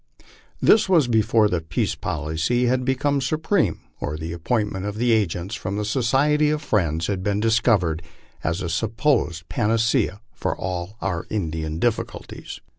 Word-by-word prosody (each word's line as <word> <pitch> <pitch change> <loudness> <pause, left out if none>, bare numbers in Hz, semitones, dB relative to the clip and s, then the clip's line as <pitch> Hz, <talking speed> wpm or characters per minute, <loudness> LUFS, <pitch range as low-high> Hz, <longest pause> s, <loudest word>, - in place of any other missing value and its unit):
This 215 -2 +5
was 165 -8 +4
before 110 -1 +3
the 90 -4 -1
peace 80 +1 -1
policy 80 - -1
had 125 +1 +1
become 140 +2 +1
supreme, 155 - 0 0.2
or 75 +1 -3
the 80 +1 -5
appointment 100 +2 -1
of 105 +1 -4
agents 105 -5 +1
from 100 -2 -3
the 105 - -1
Society 135 +6 +2
of 150 0 0
Friends 85 - 0
had 95 -1 -2
been 100 +1 0
discovered 110 -7 +2 0.4
as 90 +3 -1
a - - -2
supposed 110 - 0
pan 105 - 0
acea 115 -2 +1
for - - -2
all 90 +3 -4
our 90 -4 -2
Indian 80 -6 -2
difficulties. 115 +5 -3
105 Hz, 150 wpm, -23 LUFS, 85-125 Hz, 0.4 s, This